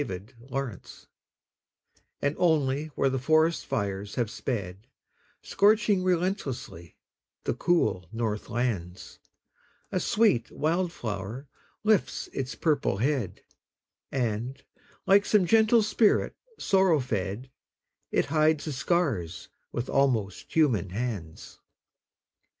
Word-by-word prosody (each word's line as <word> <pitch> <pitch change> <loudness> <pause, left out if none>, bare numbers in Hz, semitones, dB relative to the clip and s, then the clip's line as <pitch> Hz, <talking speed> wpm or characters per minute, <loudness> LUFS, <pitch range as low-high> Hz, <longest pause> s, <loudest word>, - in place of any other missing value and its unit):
FIRE 95 -9 -5 0.3
FLOWERS 130 -7 -6 1.2
And 145 +1 +1
only 150 -4 +2
where 135 - +2
the 135 - -1
forest 155 +5 +2
fires 100 0 -3
have 115 -3 -1
sped, 100 -3 -4 0.6
Scorching 210 -2 +3
relentlessly 170 - -2 0.5
the - - 0
cool 125 - +1
north 110 -2 -3
lands, 100 -7 -3 0.7
A - - 0
sweet 205 - +2
wild 170 +3 0
flower 110 - -5 0.4
lifts 215 -2 +1
its 135 -1 -3
purple 145 - +1
head, 125 -3 -1 0.7
And, 125 +2 -2 0.4
like 200 +1 +5
some 205 -3 +3
gentle 220 +3 +5
spirit 215 0 +2 0.2
sorrow 190 -5 +3
fed, 110 0 -3 0.6
It - - +1
hides 155 -1 +2
the 155 - -3
scars 130 - -1 0.2
with 120 - -3
almost 125 -8 0
human 125 - +2
hands. 100 -6 -5
135 Hz, 105 wpm, -27 LUFS, 105-165 Hz, 1.2 s, like